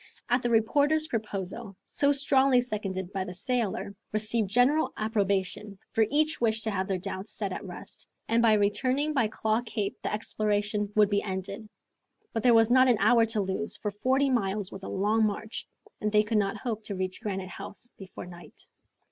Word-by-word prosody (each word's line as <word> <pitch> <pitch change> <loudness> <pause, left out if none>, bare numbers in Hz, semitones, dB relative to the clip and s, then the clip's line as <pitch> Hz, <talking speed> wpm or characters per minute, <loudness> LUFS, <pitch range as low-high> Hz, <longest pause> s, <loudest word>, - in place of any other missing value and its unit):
The 240 - 0
reporter's 285 +7 +3
proposal, 210 - -4
so 285 0 +2
strongly 275 -2 +4
seconded 195 -6 -3
by 190 -1 -1
the 185 -1 -7
sailor, 205 -3 -2 0.2
received 215 0 0
general 250 +8 +3
approbation, 200 -1 -1
for 220 -1 +3
each 310 0 +1
wished 220 -1 +1
to 220 - -1
have 190 -1 -1
their 190 - 0
doubts 190 +2 -6
set - - -2
at - - -6
rest, - - -10 0.2
and 230 +1 +3
by 230 -2 +5
returning 255 +8 +1
by 250 -6 +2
Claw 220 +1 0
Cape 215 -4 -3
the - - -2
exploration 210 -1 -1
would 210 -1 +4
be 200 0 +2
ended. 195 +2 -5 0.6
But 225 - -1
there 240 +1 +5
was 225 +1 +5
not 255 +1 +6
an 245 -3 +4
hour 230 -2 +5
to 220 -1 0
lose, 195 +3 -2
for 210 - -3
forty 265 +6 +1
miles 200 -4 -1
was 195 - -8
a - - -6
long 210 +3 +1
march, 215 +1 -3 0.3
and 210 - 0
they 210 0 +5
could 215 0 +1
not 195 -1 -1
hope 225 -4 -3
to 200 - -4
reach 185 0 -4
Granite 190 -3 -4
House 220 +5 -9
before 190 -2 -9
night. 175 -1 -13
215 Hz, 185 wpm, -28 LUFS, 200-240 Hz, 0.6 s, not